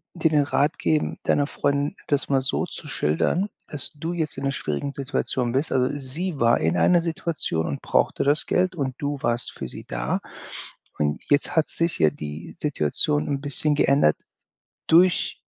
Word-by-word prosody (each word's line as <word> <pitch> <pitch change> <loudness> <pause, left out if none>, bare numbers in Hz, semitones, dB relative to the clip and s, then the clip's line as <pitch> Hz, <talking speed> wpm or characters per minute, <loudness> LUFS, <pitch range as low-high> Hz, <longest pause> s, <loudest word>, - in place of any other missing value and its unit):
dir 160 -2 +2
den 145 -2 +4
Rat 145 +2 +1
geben, 155 -1 0
deiner 145 -1 +2
Freundin 145 0 0
das 145 -1 0
mal 135 -1 +3
so 130 - -1
zu - - -9
schildern, 165 - 0 0.2
dass 145 -3 -3
du 160 +3 -4
jetzt 160 -5 -2
in 135 - -5
'ner 135 - +1
schwierigen 130 - -3
Situation 130 -3 -1
bist. 135 +4 0
Also, 125 0 +3
sie 145 +4 -4
war 120 0 +4
in 80 +2 +1
einer 170 - +5
Situation 160 - -1
und 70 - -4
brauchte - - +1
das 145 +2 +3
Geld 185 0 +1
und 135 -5 -2
du 145 0 -2
warst 120 0 -1
für - - -6
sie - - -8
da. - - -2 0.8
Und 75 0 0
jetzt 145 +2 +2
hat 160 - +3
sich 165 -1 -1
ja 80 - +5
die 75 +2 -8
Situation 75 - 0
'n 140 -1 -1
bisschen 145 +1 +2
geändert 140 - +4 0.7
durch 175 +1 +4
140 Hz, 180 wpm, -24 LUFS, 120-155 Hz, 0.8 s, einer